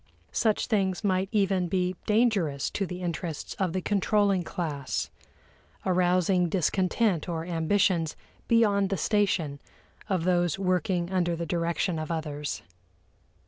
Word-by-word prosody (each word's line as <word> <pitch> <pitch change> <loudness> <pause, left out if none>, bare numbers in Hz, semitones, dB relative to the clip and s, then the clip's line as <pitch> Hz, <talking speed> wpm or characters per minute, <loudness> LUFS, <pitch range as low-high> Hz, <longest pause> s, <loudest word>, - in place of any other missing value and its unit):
Such 215 -2 +1
things 195 -3 0
might 190 -1 +1
even 195 -4 +2
be 180 +1 0
dangerous 210 - +2
to 195 - -2
the 180 0 -6
interests 165 -2 -4
of 190 -3 +1
the 185 +1 -2
controlling 205 -1 +2
class, 155 -6 -3 0.7
arousing 180 0 +2
discontent 185 +1 +1
or 165 -1 -3
ambitions 170 -1 +1 0.3
"beyond 205 -4 +3
the 195 - -1
station" 180 -10 +1 0.5
of 185 -4 +1
those 175 -2 +2
working 185 -1 0
under 175 -2 +1
the 170 0 -3
direction 170 +1 -1
of 155 - -4
others. 150 -3 -3
180 Hz, 125 wpm, -27 LUFS, 170-195 Hz, 0.7 s, beyond